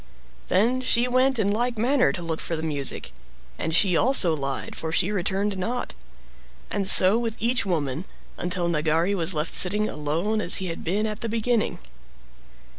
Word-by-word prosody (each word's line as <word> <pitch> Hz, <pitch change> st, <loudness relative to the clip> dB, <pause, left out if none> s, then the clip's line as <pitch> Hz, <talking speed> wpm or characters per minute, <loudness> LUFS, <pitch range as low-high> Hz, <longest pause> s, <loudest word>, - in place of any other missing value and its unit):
Then 235 Hz, +7 st, +1 dB
she 250 Hz, -1 st, +1 dB
went 255 Hz, +1 st, +1 dB
in 215 Hz, -3 st, 0 dB
like 235 Hz, +3 st, -1 dB
manner 255 Hz, +4 st, +2 dB
to 175 Hz, -4 st, -6 dB
look 160 Hz, -1 st, -4 dB
for 165 Hz, -, -4 dB
the 160 Hz, -, -6 dB
music. 145 Hz, -4 st, -3 dB, 0.5 s
And 160 Hz, -, -1 dB
she 180 Hz, -1 st, +5 dB
also 190 Hz, -6 st, +3 dB
lied, 135 Hz, -2 st, -5 dB
for 160 Hz, -, -5 dB
she 175 Hz, +4 st, +2 dB
returned 195 Hz, 0 st, -2 dB
not. 240 Hz, +7 st, -4 dB, 0.8 s
And 195 Hz, -2 st, -1 dB
so 190 Hz, +5 st, +8 dB
with 230 Hz, -2 st, -4 dB
each 235 Hz, -1 st, 0 dB
woman, 155 Hz, -2 st, -2 dB, 0.3 s
until 175 Hz, -1 st, -2 dB
Nagari 165 Hz, +3 st, 0 dB
was 175 Hz, -2 st, +1 dB
left 150 Hz, +2 st, -2 dB
sitting 210 Hz, +3 st, +2 dB
alone 165 Hz, +9 st, -2 dB
as 175 Hz, -, +4 dB
he 190 Hz, -2 st, 0 dB
had 165 Hz, -, -6 dB
been 200 Hz, +6 st, -1 dB
at 215 Hz, -1 st, -4 dB
the 230 Hz, -, -3 dB
beginning. 230 Hz, 0 st, -1 dB
195 Hz, 175 wpm, -24 LUFS, 165-225 Hz, 0.8 s, so